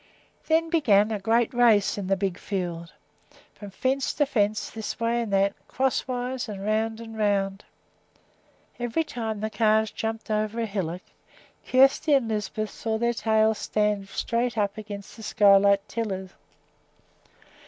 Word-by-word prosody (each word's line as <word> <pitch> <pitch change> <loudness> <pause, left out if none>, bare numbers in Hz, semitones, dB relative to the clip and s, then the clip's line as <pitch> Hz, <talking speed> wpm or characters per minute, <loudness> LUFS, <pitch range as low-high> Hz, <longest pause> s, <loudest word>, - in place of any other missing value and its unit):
Then 325 +1 +2
began 220 - +4
a 215 - -2
great 225 +4 +1
race 230 -5 +4
in 200 -2 -5
the 195 - +2
big 190 -2 -2
field, 175 -4 -4 0.6
from 205 - -10
fence 260 +7 -1
to 295 - +2
fence, 210 -5 0
this 220 -1 -6
way 230 +1 +1
and 225 -3 -4
that, 195 0 +2
crosswise, 255 -1 -2
and 200 -1 -6
round 220 +1 0
and 225 -1 -9
round. 200 -2 0 1.1
Every 240 +7 0
time 225 -7 -4
the 215 0 -2
calves 220 -1 +2
jumped 225 0 -4
over 215 +1 -1
a 230 - 0
hillock 185 -4 -4 0.6
Kjersti 275 +3 +4
and 250 -4 -2
Lisbeth 215 0 -3
saw 220 -1 -3
their 235 +1 +1
tails 220 -1 +2
stand 210 -2 0
straight 235 +4 -1
up 205 -1 0
against 205 -2 -8
the - - -10
sky 205 -2 +5
like 200 0 +3
tillers. 190 -5 -4
215 Hz, 150 wpm, -26 LUFS, 200-235 Hz, 1.1 s, sky